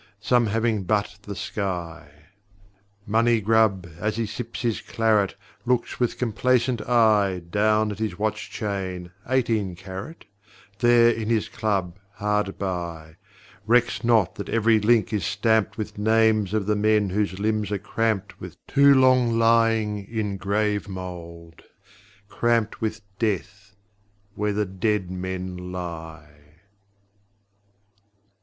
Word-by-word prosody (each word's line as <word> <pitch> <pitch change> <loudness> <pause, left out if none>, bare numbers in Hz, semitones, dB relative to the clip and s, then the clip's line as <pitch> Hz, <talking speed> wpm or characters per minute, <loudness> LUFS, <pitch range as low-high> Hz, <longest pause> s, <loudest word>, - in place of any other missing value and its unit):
Some 120 +1 +2
having 110 0 0
but 105 0 -1
the 100 0 -7
sky. 90 -6 -4 1.0
Moncygrub, 110 -3 +2
as 105 +2 -1
he 115 - 0
sips 115 +3 -6
his 115 -3 0
claret, 110 -3 +1 0.3
Looks 125 -1 -1
with 120 -2 0
complacent 125 0 +1
eye 105 -6 +3
Down 105 +1 +2
at 100 - -7
his 110 -5 -3
watch 110 +1 -2
chain, 95 -4 -4 0.2
eighteen 115 -8 0
carat 95 - -9 0.5
There, 120 -1 +5
in 110 -1 -3
his 115 -2 +1
club, 95 -4 -2
hard 105 -1 -1
by: 85 -4 -5 0.5
Recks 120 +1 +2
not 110 -6 +3
that - - -6
every 115 -1 +3
link 110 +1 +2
is 105 -4 0
stamped 110 +3 +1
with 105 -2 -5
Names 110 -2 +2
of 105 -3 0
the 105 +1 +1
men 105 -1 +2
whose 100 -1 -1
limbs 105 0 -1
are 105 - 0
cramped 105 -1 -2
with - - -9
Too 140 0 +5
long 130 -3 +4
lying 115 -2 +2
in 105 -3 -3
grave 105 +1 -1
mould, 85 -3 -8 0.7
cramped 115 -1 0
with 110 0 -2 0.2
Death 100 -1 -3 0.6
where 105 0 -1
the 105 +1 0
dead 95 0 -1
men 90 0 -5
lie. 80 -4 -8
105 Hz, 125 wpm, -24 LUFS, 95-115 Hz, 1.0 s, There